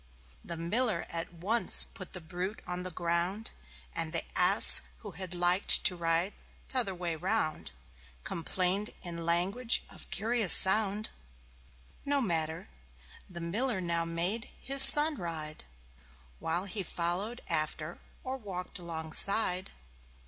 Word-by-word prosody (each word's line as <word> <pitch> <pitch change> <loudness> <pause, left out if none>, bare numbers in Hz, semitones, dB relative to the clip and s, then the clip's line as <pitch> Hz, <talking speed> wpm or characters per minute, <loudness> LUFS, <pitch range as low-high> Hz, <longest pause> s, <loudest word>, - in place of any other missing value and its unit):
The 170 - -9
Miller 200 +3 -3
at 165 +1 -6
once 195 +8 +6
put 185 -4 -11
the 180 - -8
brute 180 +5 -8
on 180 0 -6
the 185 - -5
ground; 175 +5 -4 0.4
And 165 -1 -5
the 165 - -3
Ass, - - +8 0.2
who - - -10
had 180 +1 -8
liked 175 +2 +4
to 180 - +3
ride 170 +3 -3 0.3
t'other 235 -8 -1
way 175 -2 -5
round, 170 - -4 0.5
Complained 185 +4 -4
in 170 -2 -9
language 195 +8 0
of - - -12
curious 220 -1 +3
sound. 205 +2 +2 0.9
No 285 0 -1
matter. 165 - -3 0.6
The 175 -2 -10
Miller 215 +6 -4
now 170 -2 -3
made 175 +7 -2
his 275 0 +4
Son 295 +2 +8
ride, 155 -3 -6 0.7
While 170 +4 -4
he 200 +1 -5
followed 185 +7 -4
after 155 +1 -5 0.2
or 260 +1 -7
walked 190 -5 -7
alongside. 175 +3 -1
180 Hz, 125 wpm, -28 LUFS, 170-210 Hz, 0.9 s, Ass